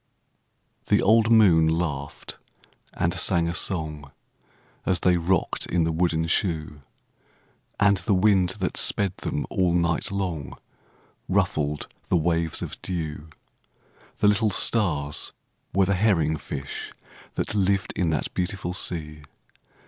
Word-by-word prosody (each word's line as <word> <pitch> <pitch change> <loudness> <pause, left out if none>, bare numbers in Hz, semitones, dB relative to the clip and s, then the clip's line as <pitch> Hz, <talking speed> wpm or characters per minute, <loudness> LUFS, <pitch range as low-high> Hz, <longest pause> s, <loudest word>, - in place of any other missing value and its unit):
The - - +4
old 110 +2 +4
moon 95 -9 +6
laughed 80 -4 -3 0.5
and 85 +1 -1
sang 85 -1 +1
a 85 - -2
song, 75 -6 -2 0.7
As 90 -3 0
they 90 -1 +4
rocked 85 +1 0
in 85 -1 +1
the 80 - 0
wooden 80 -1 +1
shoe; 80 -4 -1 1.0
And 100 -1 +4
the 95 +2 0
wind 95 -2 +3
that 95 -3 -2
sped 100 -3 +1
them - - -3
all 90 -2 +1
night 85 -1 +1
long 90 -9 -4 0.7
Ruffled 75 -1 0 0.2
the - - +3
waves 85 -1 0
of - - -7
dew; 80 -3 -4 0.9
The - - +3
little 105 +1 +3
stars 85 -9 +1 0.4
were 95 +1 +3
the 100 - +1
herring 90 -6 +2
fish 70 -2 -6 0.4
That - - -2
lived 100 -1 +1
in 90 -3 0
the 80 -3 0
beautiful 90 -1 -2
sea. 75 -5 -3
85 Hz, 125 wpm, -25 LUFS, 80-95 Hz, 1.0 s, moon